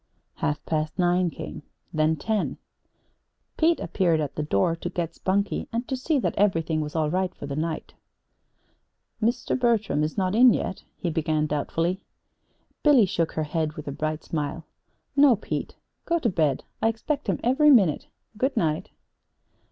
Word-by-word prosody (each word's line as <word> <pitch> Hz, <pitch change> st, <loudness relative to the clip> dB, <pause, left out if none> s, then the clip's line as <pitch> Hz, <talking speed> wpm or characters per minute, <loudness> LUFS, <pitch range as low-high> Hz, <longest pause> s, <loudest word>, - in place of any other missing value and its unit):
Half 145 Hz, 0 st, -2 dB
past 155 Hz, 0 st, -2 dB
nine 180 Hz, 0 st, +2 dB
came, -, -, -7 dB, 0.3 s
then 155 Hz, 0 st, +2 dB
ten. 210 Hz, +7 st, -1 dB, 1.0 s
Pete 330 Hz, +1 st, +3 dB
appeared 170 Hz, -5 st, +1 dB
at 145 Hz, -2 st, -2 dB
the -, -, -2 dB
door 150 Hz, -, +1 dB
to -, -, -4 dB
get 170 Hz, -2 st, -3 dB
Spunkie, 200 Hz, +2 st, -1 dB
and 235 Hz, +2 st, -2 dB
to 265 Hz, -, -1 dB
see 290 Hz, +4 st, 0 dB
that 260 Hz, -, 0 dB
everything 165 Hz, -6 st, +2 dB
was 150 Hz, +1 st, -5 dB
all 155 Hz, -2 st, +1 dB
right 185 Hz, 0 st, 0 dB
for -, -, -7 dB
the 140 Hz, -1 st, -4 dB
night. 160 Hz, +1 st, -3 dB, 1.3 s
"Mr. 230 Hz, +3 st, 0 dB
Bertram 220 Hz, -10 st, +2 dB
is 155 Hz, +5 st, -3 dB
not 185 Hz, -1 st, +1 dB
in 240 Hz, +1 st, +7 dB
yet?" 190 Hz, -, -4 dB
he 175 Hz, -, -2 dB
began 155 Hz, -1 st, 0 dB
doubtfully. 165 Hz, +5 st, -1 dB, 0.8 s
Billy 280 Hz, -8 st, +6 dB
shook 170 Hz, -3 st, -1 dB
her 155 Hz, -, -1 dB
head 155 Hz, 0 st, -1 dB
with 150 Hz, -1 st, -9 dB
a -, -, -2 dB
bright 155 Hz, +2 st, -3 dB
smile. 155 Hz, +1 st, -3 dB, 0.5 s
"No, 280 Hz, -3 st, +6 dB
Pete. 210 Hz, -, -4 dB, 0.3 s
Go 340 Hz, -, +2 dB
to 265 Hz, -8 st, +1 dB
bed. 155 Hz, -8 st, +1 dB, 0.2 s
I -, -, +3 dB
expect 250 Hz, +6 st, -2 dB
him -, -, 0 dB
every 270 Hz, +5 st, +4 dB
minute. 200 Hz, -, +4 dB, 0.3 s
Good 265 Hz, +3 st, 0 dB
night." 155 Hz, -2 st, 0 dB
170 Hz, 165 wpm, -25 LUFS, 155-225 Hz, 1.3 s, in